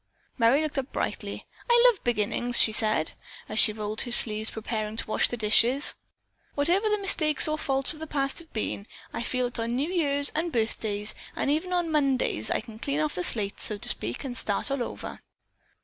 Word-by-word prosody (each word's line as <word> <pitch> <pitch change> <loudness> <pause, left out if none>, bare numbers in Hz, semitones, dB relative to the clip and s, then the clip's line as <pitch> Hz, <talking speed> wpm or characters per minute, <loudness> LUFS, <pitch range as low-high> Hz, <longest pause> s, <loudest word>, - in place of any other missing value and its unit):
Merry 250 +5 +3
looked 300 -2 -2
up 265 +1 -6
brightly. - - -4 0.2
"I 475 0 +6
love 480 -6 +4
beginnings!" 240 +1 0
she 220 - +5
said, 215 -7 0 0.3
as 215 - -2
she - - +5
rolled 215 0 -3
her 240 - -3
sleeves 215 -2 +1
preparing 220 -1 -4
to - - -2
wash 215 - +2
the 240 - -5
dishes. 235 +5 +3 0.6
"Whatever 355 +9 +2
the 420 - +2
mistakes 315 -8 +4
or 305 - 0
faults 270 -3 +2
of 310 - -13
the 315 - -6
past 275 0 -1
have 330 -1 -10
been, 210 -1 -4 0.3
I - - -3
feel 250 +1 -2
that 245 - -3
on 230 +1 -2
New 290 +7 -1
Years 285 -5 +1
and 330 +2 -1
birthdays, 220 -3 -1 0.2
and 280 - 0
even 320 +5 -1
on 350 -2 0
Mondays, 270 - +1
I - - 0
can 220 -1 -12
clean 280 +4 -2
off 305 -1 0
the 180 - -2
slate, 205 0 -1
so 210 - +3
to - - 0
speak, 115 +3 -1
and 260 -3 -5
start 210 +3 0
all 275 -2 -1
over." - - -6
250 Hz, 205 wpm, -26 LUFS, 220-305 Hz, 0.6 s, I